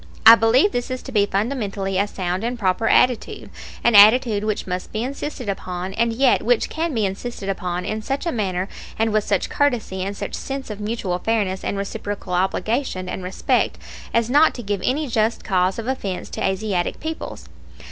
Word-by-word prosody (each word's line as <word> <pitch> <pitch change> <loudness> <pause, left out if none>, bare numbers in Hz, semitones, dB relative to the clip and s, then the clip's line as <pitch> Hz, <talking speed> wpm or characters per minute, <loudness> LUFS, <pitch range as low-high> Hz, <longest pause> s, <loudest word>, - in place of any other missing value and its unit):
I 225 - +12
believe 230 - +4
this 245 0 -2
to 265 - -9
be 205 -4 +3
fundamentally 200 -4 -1
a 200 - +2
sound 185 -1 -3
and 240 +1 -2
proper 205 +1 +1
attitude, 250 -2 +2 0.3
an 235 - +4
attitude 215 +1 +6
which 215 -1 -2
must 180 0 -4
be 220 +1 -2
insisted 275 -1 -5
upon, 185 -1 -4
and 230 +3 +1
yet 250 +2 +3
which 240 -1 +1
can 330 +1 -1
be 220 -2 +1
insisted 195 +1 -5
upon 180 -2 -3
in 215 0 -3
such 275 +8 -3
a 335 - 0
manner 190 -4 -1 0.3
and 225 -1 +1
with 215 -1 +2
such 200 -2 0
courtesy 245 -10 0
and 200 +2 -3
such - - -5
sense 270 -3 -5
of 210 - -7
mutual 210 -4 -2
fairness 200 -3 -1
and 200 - -2
reciprocal 200 -1 -5
obligation 190 +2 -1
and 180 - -5
respect 185 +1 0 0.3
as 230 -1 +2
not 295 +6 +4
to 240 - -6
give 200 -2 -2
any 295 +4 0
just 225 -1 0
cause 185 -2 +1
of 230 - -4
offense 205 -8 -3
to - - -4
Asiatic 190 -2 -1
peoples. 320 +1 -6
215 Hz, 190 wpm, -22 LUFS, 190-240 Hz, 0.3 s, I